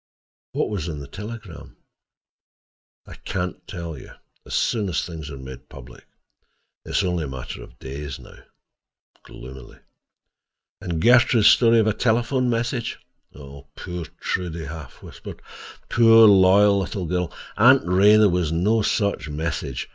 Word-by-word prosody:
"What - - -1
was 90 -5 -3
in 80 -3 -5
the 70 -1 -8
telegram?" 105 -2 -10 1.3
"I - - -12
can 90 -2 -5
tell 85 -3 -6
you—as 65 - -12
soon 105 -5 0
as 85 - -3
certain 85 -1 -4
things 75 - -8
are 70 - -8
made 65 -1 -11
public. - - -14 0.8
It - - -11
is - - +1
only 90 -3 -1
a - - -6
matter 65 -1 -7
of - - -14
days 70 0 -7
now," - - -15 0.8
gloomily. 65 +1 -12 1.0
"And 85 -2 -3
Gertrude's 120 -2 +5
story 115 -1 +5
of 110 - +3
a 110 - +1
telephone 120 +3 0
message?" 120 +1 -2 0.4
"Poor 70 -1 -12 0.5
Trude!" 90 -3 -3
he 85 - -6
half 75 -2 -10
whispered. - - -11 0.5
"Poor 115 -1 +6
loyal 100 +1 +5
little 95 -1 -4
girl! 90 0 -2 0.2
Aunt 130 +5 +5
Ray, 95 +4 +5
there 110 -1 +5
was 90 -4 0
no 105 +7 +1
such 100 -6 -1
message. 75 -1 -4
90 Hz, 145 wpm, -22 LUFS, 75-110 Hz, 1.3 s, Poor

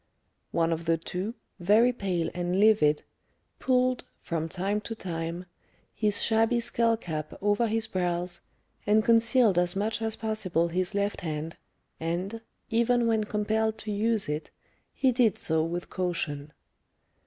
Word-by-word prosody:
One 165 0 +1
of 165 0 -5
the 165 0 +2
two, 185 +7 -4 0.2
very 215 +7 +4
pale 180 -7 -1
and 180 +1 -1
livid, 205 -9 +4 0.6
pulled, 255 -1 +2 0.2
from 165 -1 -3
time 195 +4 -1
to 225 +2 -6
time, 170 -2 -4 0.5
his 210 -2 0
shabby 225 +1 +3
skull 230 -1 +1
cap 155 -7 -5
over 205 +3 +2
his 225 0 0
brows, 180 -2 -2 0.5
and 215 +1 +4
concealed 230 -4 +4
as 175 +1 +1
much 215 +3 -1
as 220 -1 -1
possible 190 -7 -1
his 180 +3 -1
left 200 0 -1
hand, 160 0 -4 0.4
and, 180 +7 -3 0.3
even 235 +1 +3
when 220 -2 +2
compelled 220 +1 0
to 215 - -5
use 215 +1 +1
it, 150 +1 -3 0.4
he 265 -2 +2
did 235 -4 +3
so 160 -1 +2
with 175 +2 -4
caution. 160 -5 -2
200 Hz, 145 wpm, -28 LUFS, 170-225 Hz, 0.6 s, very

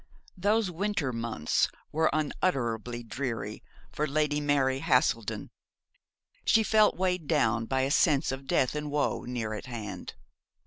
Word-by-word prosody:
Those 205 +1 +1
winter 180 -7 -1
months 115 -9 0 0.2
were 160 +2 +2
unutterably 120 - -1
dreary 120 -1 -4 0.3
for 150 - -1
Lady 150 0 +1
Mary 135 -2 +2
Haselden. 120 -5 +1 0.9
She 225 - +4
felt 215 0 +4
weighed 180 -4 0
down 115 -7 +2
by 130 -1 +1
a 135 +1 0
sense 150 -2 +3
of 135 0 -6
death 130 - +2
and 150 0 -3
woe 145 0 0
near 115 -3 -3
at 110 - -6
hand. 115 -4 -6
140 Hz, 135 wpm, -29 LUFS, 120-160 Hz, 0.9 s, She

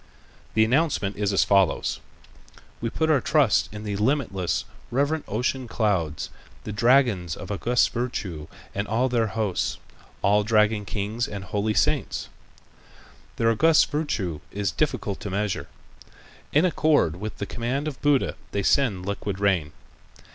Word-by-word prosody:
The 110 0 +5
announcement 125 -6 +1
is 105 -1 0
as 95 -6 +4
follows: 95 -1 +2 0.8
"We 115 - -1
put 160 +6 +1
our 140 -4 +3
trust 145 -8 +3
in 105 +1 -7
the 105 -2 -3
limitless, 105 - 0 0.2
reverent 145 +5 0
ocean 125 +4 -1
clouds, 95 -10 -1 0.3
the - - -5
dragons 110 - +3
of - - -8
august 120 +5 +2
virtue 95 -11 -3 0.3
and 100 +1 -2
all 120 +5 +1
their 115 -2 +1
host, 110 -4 -1 0.5
all 105 +2 +4
dragon 105 -1 +2
kings 105 +4 -2
and 100 -2 -6
holy 105 +2 -1
saints. - - 0 1.1
Their 115 0 +2
august 160 +8 +4
virtue 105 - -2
is 100 -1 -2
difficult 125 -9 -1
to 105 - -5
measure. 100 +1 -2 0.8
In 150 +5 +4
accord 150 - +2
with 105 +3 -6
the 100 - -3
command 125 +8 -2
of 145 -4 -6
Buddha 145 -2 +2 0.2
they 100 - 0
send 100 -8 +2
liquid 100 -1 -3
rain. 95 -7 +1
105 Hz, 140 wpm, -25 LUFS, 100-130 Hz, 1.1 s, The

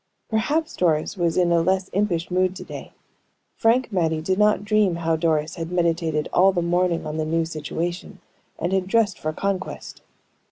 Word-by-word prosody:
Perhaps 295 +9 0
Doris 160 -2 +1
was 170 -3 0
in 175 -1 +3
a 170 -1 +4
less 185 +2 0
impish 180 -4 0
mood 185 0 +1
to - - -7
day. - - -9 0.6
Frank 235 +2 +2
Mattie 160 -4 +1
did 185 +5 -1
not 210 -1 +3
dream 205 -4 +2
how 165 -1 0
Doris 160 -1 0
had 165 0 -5
meditated 165 -3 0
all 190 +2 +5
the 175 -2 -1
morning 175 0 +1
on 155 +1 -4
the 155 - 0
new 165 +1 0
situation, 170 +4 -5 0.4
and 175 +3 -2
had 190 -1 +1
dressed 210 -2 +1
for 155 - -2
conquest. 195 +3 -4
175 Hz, 175 wpm, -23 LUFS, 165-195 Hz, 0.6 s, all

